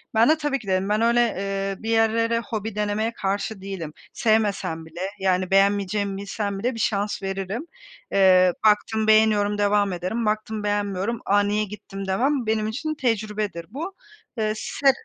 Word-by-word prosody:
Ben 225 +5 +5
de 315 - +5
tabii 295 -3 -1
ki, 215 - -14
dedim. 190 +1 0
Ben 210 +1 +2
öyle, 235 +1 +3
eee, 195 -3 -2
bir 225 - -3
yerlere 230 +1 +2
hobi 220 -2 -5
denemeye 210 +2 -1
karşı 200 0 -3
değilim. 185 -6 -6 0.2
Sevmesem 210 -7 0
bile, 165 +2 -9 0.2
yani, 185 -1 +1
beğenmeyeceğimi 200 0 +2
bilsem 200 0 -3
bile 245 +5 -1
bir - - -6
şans 205 -2 -1
veririm. 195 - -3 0.5
Eee, 185 -2 +5
baktım 215 +1 +3
beğeniyorum 215 -1 +4
devam 205 -1 +2
ederim, 185 +7 -2
baktım 215 0 -1
beğenmiyorum, 205 +1 -1
"A, 205 +1 +4
niye 205 +1 +1
gittim?" 195 -1 -7
demem, 250 +7 +1
benim 220 -1 +1
için 310 +8 -3
tecrübedir 215 - -2
bu. 325 - -6 0.4
Eee, 215 -1 0
se 275 +5 +2
210 Hz, 160 wpm, -24 LUFS, 195-225 Hz, 0.5 s, Ben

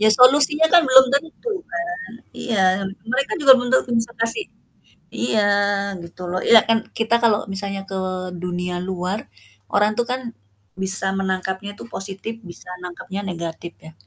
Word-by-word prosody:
Ya 215 - +5
solusinya 285 +6 +5
kan 350 - +8
belum 260 0 +8
tentu 320 - -2 0.2
kan, 345 +1 -3 0.5
iya, 190 -5 +1 0.2
mereka 255 +4 -1
juga 275 -2 +9
belum 245 - -3
tentu 260 -1 +2
bisa 235 +1 -3
kasih 230 - 0 0.7
iya, 220 -2 0 0.6
gitu 170 +2 -10
loh, 185 +1 -1
iya 225 -1 +8
kan 225 0 +4 0.2
kita 225 0 +1
kalau 220 -3 +3
misalnya 195 0 -3
ke 195 - -5 0.4
dunia 180 0 -4
luar, 185 - -4 0.4
orang 210 +1 +3
tuh 240 - +2
kan 255 +1 -1 0.6
bisa 190 0 0
menangkapnya 190 +1 -3
itu - - -10
positif, 195 +3 -4
bisa 175 0 -11
nangkapnya 180 +2 -6
negatif 170 -2 -6
ya. 160 - -11
205 Hz, 150 wpm, -21 LUFS, 185-245 Hz, 0.7 s, juga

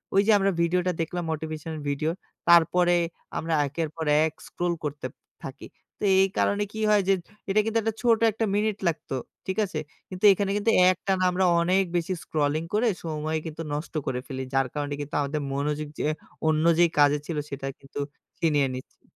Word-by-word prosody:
ওই 195 - +7
যে 225 - +6
আমরা 195 0 +2
ভিডিওটা 180 +2 +2
দেখলাম 175 +2 -3
motivational 155 0 -5
ভিডিও। 155 +3 0 0.4
তারপরে 175 +1 +5 0.4
আমরা 165 +1 -2
একের 155 +3 -3
পর 160 -1 -3 0.2
এক 160 - 0
scroll 175 0 -1
করতেপ 145 -3 -4 0.3
থাকি। 135 +1 -8 0.3
তো - - -8 0.2
এই 195 - +5
কারণে 205 0 +2
কি 220 - -5
হয় 210 -1 +5
যে 195 - +5 0.4
এটা 205 - +3
কিন্তু 225 0 0
একটা 220 0 -1
ছোট 230 -2 +4
১ 210 - -5
টা - - +4
মিনিট 210 0 +1
লাগতো, 155 -4 -2 0.3
ঠিক 190 -1 -3
আছে? 175 -5 -4 0.3
কিন্তু 185 +2 -8
এইখানে 195 0 +1
কিন্তু 210 +2 +2 0.2
একটানা 185 0 -1
আমরা 185 +1 +1 0.2
অনেক 185 +3 +3
বেশি 175 +2 -1
scrolling 155 +1 0
করে 225 +3 +3 0.2
সময় 155 -1 -2
কিন্তু 160 0 -6
নষ্ট 150 +3 -4
করে 125 - -1
ফেলি। 130 -2 -4
যার 135 -1 +2
কারণে 145 -1 -3
কিন্তু 145 0 -6
আমাদের 145 +1 -2
মনোযোগ 150 +2 -1
যে - - 0 0.4
অন্য 155 0 +2
যেই 170 0 +5
কাজে 145 0 +5
ছিল 160 -2 -4
সেটা 135 -1 -5
কিন্তু 140 +1 -9 0.4
ছিনিয়ে 145 -4 +2
নিচ্ছে। 130 - -11
165 Hz, 185 wpm, -26 LUFS, 150-190 Hz, 0.4 s, ওই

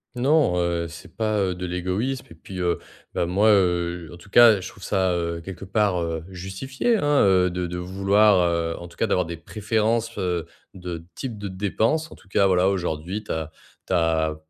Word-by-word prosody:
Non, 135 - +3
heu, 85 -1 -1
c'est 80 0 -12
pas, 110 -1 0
heu, 95 -2 0
de 90 +1 -5
l'égoïsme 95 +9 -2
et - - -11
puis, 90 +3 -9
heu, 90 -1 0 0.3
ben, - - 0
moi, 100 +5 +2
heu 90 -4 +2
en - - -10
tout 85 +4 -16
cas, 115 -1 +7
je 90 - -6
trouve - - -15
ça, 95 -1 +1
heu, 85 -1 -2
quelque 90 +2 -8
part, 100 -2 +1
heu, 80 -1 -3
justifié, 95 - -2
hein, 145 -5 +3
heu, 95 -2 +4
de 90 0 -3
de 90 +1 -4
vouloir 95 +2 +3
heu 85 -1 0
en 85 - -9
tout - - -18
cas, - - +1
d'avoir 90 - +1
des 85 0 -6
préférences, 110 +5 -1
heu, 90 -3 -1 0.3
de 90 -3 -7
type 120 -5 -5
de 100 - -5
dépenses, 110 - 0
en - - -10
tout - - -21
cas, 100 +1 +3
voilà. 95 -1 +3
Aujourd'hui 90 +1 -2
tu - - -7
as 80 -1 -3 0.4
tu - - -2
as 80 -2 +2
90 Hz, 205 wpm, -24 LUFS, 85-105 Hz, 0.4 s, cas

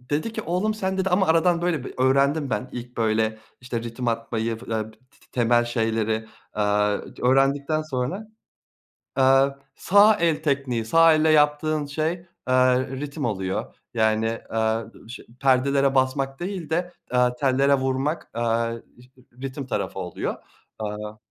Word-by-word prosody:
Dedi 145 - -2
ki - - -4
oğlum 185 +6 0
sen 190 -2 -2
dedi 190 0 +1
ama 190 +1 +3
aradan 170 +1 +3
böyle 165 -7 0
bir - - -8
öğrendim 140 +2 +2
ben. 110 +4 -2
İlk 125 0 -8
böyle 110 -1 +1 0.2
işte 120 -2 -4
ritim 120 +1 -4
atmayı 115 0 -2
f 125 - -13
te 110 -1 -2
te 110 - -22 0.3
temel 120 -1 +3
şeyleri, 110 -1 -1 0.2
aaa, 105 0 +1 0.2
c - - -11
öğrendikten 140 +4 +2
sonra 155 +9 -3 0.9
Aaa, 135 +1 +5 0.3
sağ 205 +2 +5
el 160 -4 0
tekniği, 135 -6 0
sağ 165 +5 +6
elle 155 0 +3
yaptığın 150 0 +2
şey, 155 +3 -1 0.4
eee, 130 0 +3
ritim 145 0 -4
oluyor. 95 -4 -3 0.2
Yani, 110 -1 +2 0.3
eee, 110 0 0 0.3
şe 125 - -9 0.2
perdelere 135 +1 +3
basmak 135 +1 0
değil 180 -3 -5
de, 175 +2 -1 0.2
eee, 125 0 +4
tellere 140 +1 +3
vurmak, 135 +4 -1
eee, 115 0 -1 0.2
ş 125 - -21 0.3
ritim 135 0 -5
tarafı - - -3
oluyor. - - -3 0.4
Aaa 105 0 -5
130 Hz, 145 wpm, -24 LUFS, 115-155 Hz, 0.9 s, sağ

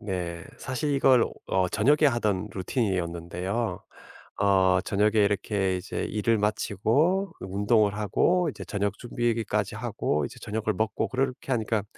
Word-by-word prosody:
네. 90 -5 -4
사실 130 +3 -2
이걸 130 -3 +5 0.2
어 95 -1 +1
저녁에 150 - +3
하던 105 -6 0
루틴이었는데요. 90 0 -2 0.6
어 95 -2 +4
저녁에 105 +2 +1
이렇게 100 -2 +1
이제 90 +1 -4
일을 110 +1 +1
마치고 115 - +1
그 - - -7
운동을 100 +2 +2
하고 170 - +2
이제 - - -8
저녁 100 0 -2
준비까지 120 -2 -1
하고 75 -1 -1
이제 - - -9
저녁을 110 0 -2
먹고 110 0 -1
그렇게 130 0 -2
하니까 110 -3 0
105 Hz, 305 characters per minute, -27 LUFS, 95-120 Hz, 0.6 s, 이걸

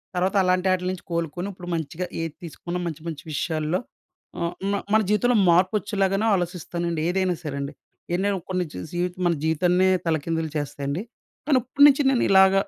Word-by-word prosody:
తర్వాత 185 +3 +1
అలాంటాటిల్నుంచి 185 0 +1
కోలుకొని 170 +3 -2
ఇప్పుడు 175 -1 -10
మంచిగా 160 +3 -3 0.2
ఏది 165 -2 -3
తీసుకున్న 175 +2 -5
మంచి 160 -2 -5
మంచి 160 -3 -5
విషయాల్లో, 155 +3 -1 0.6
ఆహ్, 170 +1 -1 0.2
మ - - 0 0.2
మన 220 - +6
జీవితంలో 240 +2 +3
మార్పొచ్చేలాగానే 195 +2 +2
ఆలోచిస్తానండి. 170 -2 -2
ఏదైనా 185 -1 +1
సరే 140 -2 -4
అండి. 140 +2 -5 0.4
ఎన్నైనా 195 +1 0
కొన్ని 185 -1 0
చూసి 90 - -6
జీవితం 180 +1 -2
మన 170 - +3
జీవితాన్నే 180 +4 +3 0.2
తలకిందులు 160 0 -1
చేస్తాయండి. 145 +4 -3 0.4
కానీ 280 -4 +5
ఇప్పుడినుంచి 285 +2 +5
నేనిలాగ 190 -7 +5
180 Hz, 140 wpm, -24 LUFS, 160-190 Hz, 0.6 s, మన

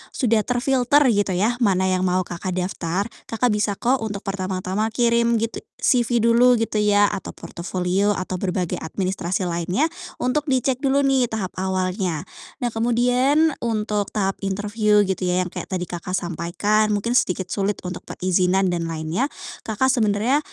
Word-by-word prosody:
sudah 230 -5 +2
terfilter 255 +2 +2
gitu 205 -2 +1
ya 225 +6 +1
mana 190 -4 +3
yang 185 0 +1
mau 185 +1 +2
Kakak 180 +1 -5
daftar, 180 +1 -2 0.2
Kakak 235 +2 +1
bisa 210 -1 0
kok 255 +2 +1
untuk 205 -2 -4
pertama-tama 190 +2 -2
kirim 235 -1 +2
gitu 230 +1 -2 0.2
CV 240 -2 +3
dulu 240 +2 +5
gitu 225 -2 -1
ya 205 0 +4
atau 200 - -6
portofolio 185 +3 -1
atau 185 0 -4
berbagai 180 -2 -2
administrasi 185 +1 -2
lainnya 180 - 0 0.2
untuk 290 +4 -1
dicek 260 -1 +1
dulu 275 0 +2
nih 265 -3 +3
tahap 210 -5 -4
awalnya. 185 -3 -1 0.4
Nah 240 - 0
kemudian 245 +7 +2
untuk 210 -3 -1
tahap 195 -2 0
interview 205 +1 +1
gitu 190 -1 -2
ya 180 +1 +2
yang 180 - -7
kayak - - -6
tadi 185 -2 -2
Kakak 180 +2 -4
sampaikan, 180 +5 0
mungkin 230 +4 -2
sedikit 185 -6 +1
sulit 200 -1 -1
untuk 180 0 -7
perizinan 185 0 +1
dan 170 -1 -2
lainnya, 165 - -1 0.4
Kakak 260 +5 +2
sebenarnya 225 +4 +2
205 Hz, 155 wpm, -22 LUFS, 185-235 Hz, 0.4 s, dulu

